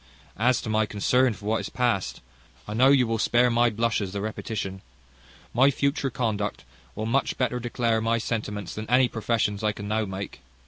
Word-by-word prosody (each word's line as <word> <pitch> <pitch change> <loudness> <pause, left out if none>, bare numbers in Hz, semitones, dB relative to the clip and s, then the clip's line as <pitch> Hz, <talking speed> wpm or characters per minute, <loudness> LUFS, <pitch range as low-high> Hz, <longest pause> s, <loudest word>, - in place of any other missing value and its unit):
As 125 +2 +2
to - - -4
my 110 0 +2
concern 125 +5 +2
for 100 +1 -12
what 110 +1 +1
is - - -5
past, 120 -7 -1 0.5
I - - -4
know 125 +4 +5
you 135 -3 +5
will 115 -1 -1
spare 120 +2 +3
my 120 +1 +4
blushes 110 -3 -1
the 100 - -2
repetition. 105 -2 -4 0.7
My 130 +4 +5
future 140 0 0
conduct 110 -4 -2 0.3
will 110 - -3
much 130 +5 0
better 125 -1 0
declare 115 -1 0
my 115 +1 +1
sentiments 105 -5 -3
than 110 0 -6
any 125 +1 +5
professions 110 -3 -1
I 105 -1 +2
can 100 0 -7
now 110 +1 0
make. 95 0 -6
115 Hz, 185 wpm, -26 LUFS, 105-125 Hz, 0.7 s, know